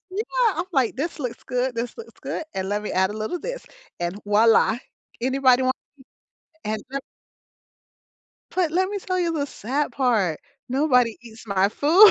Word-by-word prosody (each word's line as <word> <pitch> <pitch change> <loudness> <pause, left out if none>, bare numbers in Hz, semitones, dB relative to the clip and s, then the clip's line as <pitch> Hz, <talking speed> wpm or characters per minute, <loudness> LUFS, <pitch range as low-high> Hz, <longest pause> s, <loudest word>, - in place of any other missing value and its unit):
Yeah. 455 +1 +2
I'm - - 0
like, 265 -7 +2
"This 310 +5 -3
looks 245 -4 -4
good, 250 0 -1
this 235 +1 -3
looks 460 - -10
good. - - -3
And 190 0 -2
let 205 +1 0
me 210 - -4
add 190 0 +3
a 210 - -5
little 220 +11 -2
this - - -5 0.3
and 175 +3 -2
voila. 220 +2 +5 0.4
Anybody 260 0 +4
want?" 260 +1 +2 0.9
And 215 0 -1
so 275 - -1 1.6
But 350 -4 +1
let 375 +2 +2
me 410 - -2
tell 370 -1 -2
you 340 -2 +1
the 290 -3 -1
sad 280 +3 -2
part. 215 - +1 0.3
Nobody 250 -4 +3
eats 225 -1 -13
my 195 -1 +3
food. 340 - +7
255 Hz, 170 wpm, -24 LUFS, 220-330 Hz, 1.6 s, food